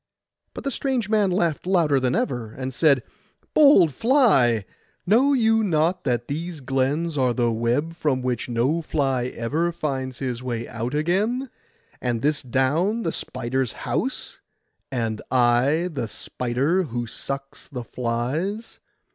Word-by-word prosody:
But - - -6
the 275 - -1
strange 255 -5 -1
man 210 -3 +3
laughed 175 -3 0
louder 165 -7 +3
than 130 -1 0
ever, 120 -5 -2
and 130 0 -5
said— 140 -4 +3 0.5
'Bold 280 - +6
fly, 135 - +3 0.4
know 245 +9 +4
you 225 -3 +3
not 175 0 +1
that 120 -3 0
these 165 +3 -4
glens 140 +4 -1
are 125 -2 +2
the 120 -2 +2
web 120 +8 0
from 145 -6 -1
which 125 -1 -2
no 125 +8 +1
fly 135 -6 0
ever 145 +8 -1
finds 130 -6 -3
his 125 -3 -3
way 120 -2 -3
out 120 +4 -4
again, 210 - 0 0.5
and 120 -2 -1
this 150 +1 +1
down 150 - +1
the 165 - 0
spider's 130 -2 -2
house, - - -2 0.5
and 115 -4 -2
I 130 +7 +3
the 125 -6 -2
spider 125 - -1
who 120 -4 -3
sucks 135 +5 -6
the 125 -3 -6
flies? 130 - -3
140 Hz, 140 wpm, -24 LUFS, 125-175 Hz, 0.5 s, Bold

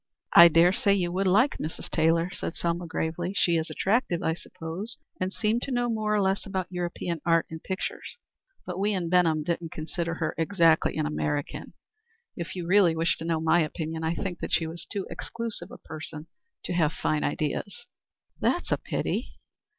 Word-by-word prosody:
"I 170 - +11
dare 170 +2 +5
say 200 +1 +3
you 175 -3 0
would 190 +2 0
like 215 +10 +3
Mrs. 155 - -5
Taylor," 165 +2 +2
said - - -4
Selma, 170 0 -2
gravely. 170 +3 -2
"She 170 -2 +3
is 160 0 0
attractive, 195 -4 +1
I 160 - +2
suppose, 175 +7 -6 0.2
and 185 +1 -1
seemed 220 +3 0
to 275 - -4
know 245 -1 +1
more 215 -1 0
or - - +3
less 190 +1 +1
about 190 -2 -3
European 175 -2 -3
art 165 -1 +3
and 160 0 -6
pictures, 190 - -4 0.5
but 180 0 -4
we 205 +2 +1
in 180 -4 -1
Benham 165 -4 +3
didn't 170 0 -2
consider 165 +1 -3
her - - -2
exactly 165 -2 +3
an 155 - +1
American. 150 -1 -2 0.6
If 170 +1 -5
you 180 -2 -4
really 180 -2 +5
wish 165 +1 +1
to 165 - -6
know 165 -1 +1
my 160 +2 +3
opinion, 160 0 -2
I 160 +1 0
think 180 -2 -4
that - - -4
she 165 - +2
was 165 +1 -6
too 200 -3 -2
exclusive 230 -6 -5
a 245 - -10
person 155 -1 -8 0.4
to - - -3
have 160 -3 +2
fine 150 -1 0
ideas." 145 0 -2 0.5
"That's - - 0
a - - +3
pity." - - -3
170 Hz, 190 wpm, -27 LUFS, 160-190 Hz, 0.6 s, I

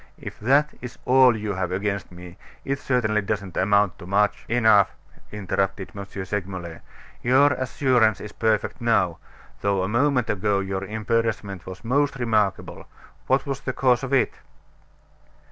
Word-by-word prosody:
If - - -9
that 140 +7 +3
is 125 -1 -8
all 130 -2 +5
you 105 -1 -3
have 90 -1 -2
against 100 -1 -2
me, 90 0 -11 0.3
it 140 +1 -2
certainly 110 -6 +1
doesn't 100 -3 -4
amount 100 0 +2
to 90 - -10
much 105 +2 +1
" - - -22
"Enough!" 110 -4 +4 0.4
interrupted 95 -1 -2
M. 100 0 -6 0.2
Segmuller. 90 -4 -5 0.4
"Your 135 +3 +4
assurance 125 -4 +1
is 105 - -8
perfect 110 -1 -1
now; 110 -8 +1 0.4
though 100 -2 +1
a - - -1
moment 125 +2 +1
ago 100 0 0
your 95 0 -3
embarrassment 110 -2 -2
was 95 +4 -9
most 140 +4 +1
remarkable. 110 -6 -1 0.4
What 135 0 +2
was 135 -2 -3
the 130 - -3
cause 125 -2 +2
of 135 -1 -5
it?" 135 - +2
105 Hz, 150 wpm, -24 LUFS, 95-125 Hz, 0.4 s, all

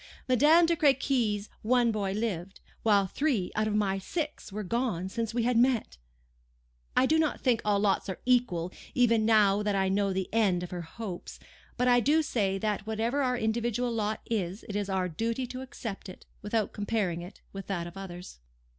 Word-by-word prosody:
Madame 300 +7 +6
de 335 0 +2
Crequy's 255 -8 +2
one 240 +1 +3
boy 205 -3 -1
lived; 195 -3 -3 0.2
while 205 -3 +4
three 230 - -1
out 215 0 +1
of 210 - -1
my 195 -2 +1
six 300 - -4
were 210 +2 -4
gone 210 -3 -1
since 230 +3 -3
we 235 0 0
had 245 +1 +1
met! 240 - +2 1.0
I 260 - +6
do 315 +4 +3
not 315 -2 0
think 245 -4 +2
all 205 -1 +2
lots 200 -1 +1
are 190 - -4
equal, 215 -9 +2 0.2
even 230 -4 +3
now 210 -2 +4
that 210 -1 0
I 190 -1 +1
know 200 0 +1
the 190 -1 -2
end 195 -6 +2
of 180 - -7
her 175 -1 -4
hopes; 180 +2 -7 0.4
but 250 0 +2
I 245 0 +6
do 300 +6 +3
say 200 -8 0
that 210 0 -2
whatever 225 +6 0
our 250 -2 +1
individual 235 +2 0
lot 215 -1 -1
is, 195 -3 -3
it 205 - -5
is 205 -1 -2
our 190 -1 0
duty 230 +9 -2
to 255 +1 -7
accept 225 -6 -7
it, 185 - -12 0.2
without 210 0 -1
comparing 205 -5 -1
it 175 +2 -11
with 195 0 -7
that 175 -4 -2
of 170 - -9
others. 180 - -9
215 Hz, 190 wpm, -29 LUFS, 195-245 Hz, 1.0 s, Madame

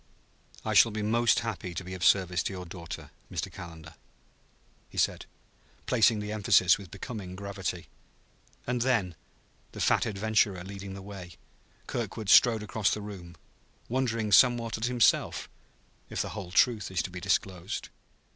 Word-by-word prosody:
"I - - 0
shall - - +7
be 105 0 -3
most 115 +2 +3
happy 95 -6 -5
to 90 - -4
be 90 +1 -7
of 95 -1 -5
service 90 -2 +3
to - - -3
your 90 -1 -6
daughter, 85 -1 -8 0.2
Mr. - - -3
Calendar," 80 -2 -10 1.0
he - - -13
said, - - 0 0.6
placing 115 -2 +3
the 105 0 -4
emphasis 100 -4 +4
with 95 -3 -11
becoming 95 -4 -7
gravity. 95 -2 -5 0.8
And 125 -1 -1
then, 115 -8 +1 0.6
the - - -8
fat - - +2
adventurer 105 -3 +1
leading 95 0 -8
the 95 - -9
way, 95 -3 -9 0.5
Kirkwood 110 -3 -4
strode 115 -3 +6
across 105 -1 0
the - - -1
room 95 -5 -9 0.5
wondering 115 -4 -1
somewhat 120 +1 +5
at 110 - -2
himself, 120 -3 +2 0.6
if - - -4
the - - -5
whole 100 -5 -7
truth 115 +3 +2
is 95 -3 -1
to 90 - -6
be 90 - -6
disclosed. 95 0 -2
100 Hz, 155 wpm, -29 LUFS, 90-110 Hz, 1.0 s, shall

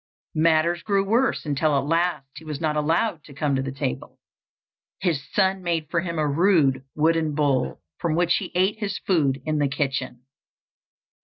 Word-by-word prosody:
Matters 165 +2 +2
grew 200 -1 +1
worse 235 +2 +1
until 150 0 +1
at 135 - -1
last 165 -1 0
he - - -11
was 150 -3 -5
not 155 -2 0
allowed 160 +3 0
to 140 - -13
come 145 -1 0
to 135 - 0
the 135 0 -4
table. 130 - -4 0.8
His 170 -7 0
son 190 -1 +2
made 165 -3 -2
for 170 - +2
him 170 -1 -4
a 155 -1 +1
rude 145 -4 +3
wooden 160 -1 +1
bowl, 145 -3 0 0.2
from 165 -2 0
which 175 0 +3
he - - -5
ate 190 +4 +2
his 205 -2 -2
food 145 -8 0
in 155 -1 0
the 145 - +2
kitchen. 130 -3 -3
155 Hz, 175 wpm, -24 LUFS, 145-175 Hz, 0.8 s, rude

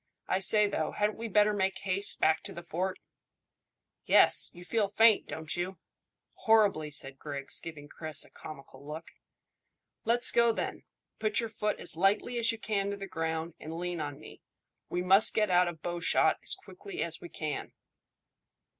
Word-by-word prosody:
I 185 - +1
say, 210 +2 +4
though, 160 -6 -2
hadn't 210 +1 0
we 230 - -3
better 210 0 +4
make 190 -1 0
haste 195 +1 -2
back 160 0 +3
to - - -2
the 170 - -8
fort?" 185 +3 -2 1.1
"Yes; - - +5
you 175 - -12
feel 215 +1 +1
faint, 220 +1 +4
don't 160 -1 -5
you?" 180 +1 -3 0.6
"Horribly," 205 -9 +3
said 135 -2 -3
Griggs, 140 -2 -4
giving 150 -3 -9
Chris 155 +1 -3
a - - -20
comical 140 -2 -11
look. 155 +3 -8 0.9
"Let's 235 +2 +3
go, 235 -1 +4
then. - - -4 0.3
Put 215 -1 +1
your 230 -1 -2
foot 210 -1 -2
as - - -3
lightly 200 +7 +1
as 230 - +3
you 225 - -6
can 200 -2 -1
to 200 - -3
the 195 - -6
ground, 160 -2 -3
and 160 +1 -7
lean 175 -1 -3
on 145 -1 -5
me. - - -13 0.5
We 180 - -1
must 195 +4 +5
get 210 -3 +2
out 180 0 +5
of 165 -3 -6
bowshot 175 0 +2
as - - 0
quickly 400 -3 -7
as 165 -1 -4
we 175 - -9
can." 155 -2 -5
185 Hz, 175 wpm, -30 LUFS, 160-210 Hz, 1.1 s, Yes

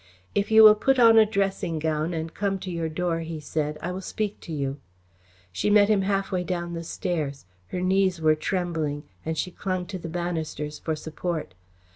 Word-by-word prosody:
"If 200 - 0
you 220 0 +8
will 215 -1 +11
put 270 +5 +2
on 230 -2 +7
a 215 - +6
dressing 195 -5 -1
gown 155 +1 -1
and 160 -1 -4
come 195 -1 -1
to 185 - -5
your 165 -2 -2
door," 165 +1 -1
he 165 -1 -5
said, 150 0 -2
"I 175 - -2
will 185 +1 -5
speak 210 +1 -3
to 170 - -10
you." 140 -2 -2 0.7
She 90 - -1
met 205 0 +5
him 210 -2 +4
halfway 195 -2 0
down 175 -1 -3
the 165 0 -4
stairs. 155 - -3 0.2
Her 180 - -4
knees 185 -1 +2
were 155 -1 +4
trembling, 155 -3 -2 0.2
and 160 0 -3
she 180 - -2
clung 185 0 -3
to 185 +1 -6
the 165 - -6
banisters 160 -3 -3
for 160 - -2
support. 160 - -4
175 Hz, 195 wpm, -26 LUFS, 160-195 Hz, 0.7 s, will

